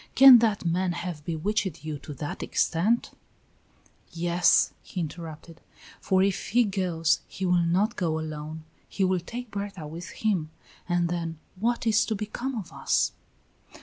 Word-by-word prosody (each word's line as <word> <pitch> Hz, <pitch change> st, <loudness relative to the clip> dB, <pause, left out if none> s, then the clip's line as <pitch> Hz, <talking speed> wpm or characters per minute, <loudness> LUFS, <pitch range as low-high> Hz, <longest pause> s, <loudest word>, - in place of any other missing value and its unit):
Can 265 Hz, -2 st, +10 dB
that 215 Hz, -5 st, +1 dB
man 175 Hz, +1 st, +1 dB
have 175 Hz, -3 st, -5 dB
bewitched 170 Hz, -1 st, -2 dB
you 150 Hz, -2 st, -4 dB
to 150 Hz, -, -8 dB
the 145 Hz, +3 st, -4 dB
extent 205 Hz, +9 st, +1 dB, 0.5 s
" -, -, -34 dB, 0.2 s
"Yes," 175 Hz, +1 st, +4 dB
he 185 Hz, -, -7 dB
interrupted, 165 Hz, 0 st, -7 dB, 0.4 s
"for 190 Hz, 0 st, +2 dB
if 195 Hz, -1 st, -1 dB
he 245 Hz, +3 st, +4 dB
goes 180 Hz, -6 st, +1 dB
he 190 Hz, -, -5 dB
will 180 Hz, -1 st, +3 dB
not 195 Hz, +7 st, +1 dB
go 165 Hz, -4 st, 0 dB
alone; 155 Hz, 0 st, -6 dB, 0.3 s
he 195 Hz, -, -1 dB
will 185 Hz, -1 st, +2 dB
take 235 Hz, +6 st, -7 dB
Berta 200 Hz, -5 st, -5 dB
with 165 Hz, +3 st, -7 dB
him, 190 Hz, -8 st, -1 dB, 0.4 s
and 175 Hz, 0 st, +2 dB
then 165 Hz, -2 st, -3 dB, 0.2 s
what 235 Hz, +5 st, -1 dB
is 220 Hz, -1 st, +4 dB
to 220 Hz, -, -1 dB
become 225 Hz, +6 st, -4 dB
of 205 Hz, -7 st, -6 dB
us?" -, -, +1 dB
180 Hz, 155 wpm, -27 LUFS, 165-210 Hz, 0.5 s, Can